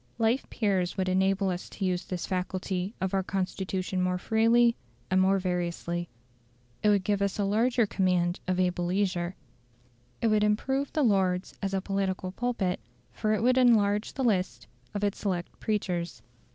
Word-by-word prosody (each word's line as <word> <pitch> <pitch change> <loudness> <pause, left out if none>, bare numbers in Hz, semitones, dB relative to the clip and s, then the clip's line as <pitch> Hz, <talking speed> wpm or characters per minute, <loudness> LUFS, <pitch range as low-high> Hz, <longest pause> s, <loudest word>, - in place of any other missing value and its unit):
Life 230 +3 +1
peers 190 -5 0
would 190 -1 0
enable 190 +1 +2
us 180 0 -5
to 195 - -4
use 180 -1 -1
this 180 -2 -4
faculty 185 +1 -2
of 190 0 -2
our 195 - +2
Constitution 190 0 -2
more 180 0 +1
freely 230 +4 +3 0.4
and 185 0 +4
more 195 +1 +4
variously. 175 -2 -2 0.7
It 210 - +3
would 200 -2 +3
give 200 +1 0
us 200 -1 0
a 205 - +1
larger 230 +4 +2
command 180 -3 +1
of 185 0 0
able 180 -1 +1
leisure; 180 -1 0 0.8
it 230 - +2
would 215 -1 +3
improve 265 +7 0
the 305 - +1
Lords 190 -5 +1
as 195 -1 -1
a 190 - 0
political 190 -1 -2
pulpit, 200 -4 -1 0.3
for 215 - -1
it 215 - 0
would 255 +1 +4
enlarge 210 -4 +3
the 265 - -2
list 185 - 0 0.3
of 205 - -2
its 205 -1 0
select 180 -4 -3
preachers. 175 - -2
195 Hz, 165 wpm, -28 LUFS, 180-210 Hz, 0.8 s, and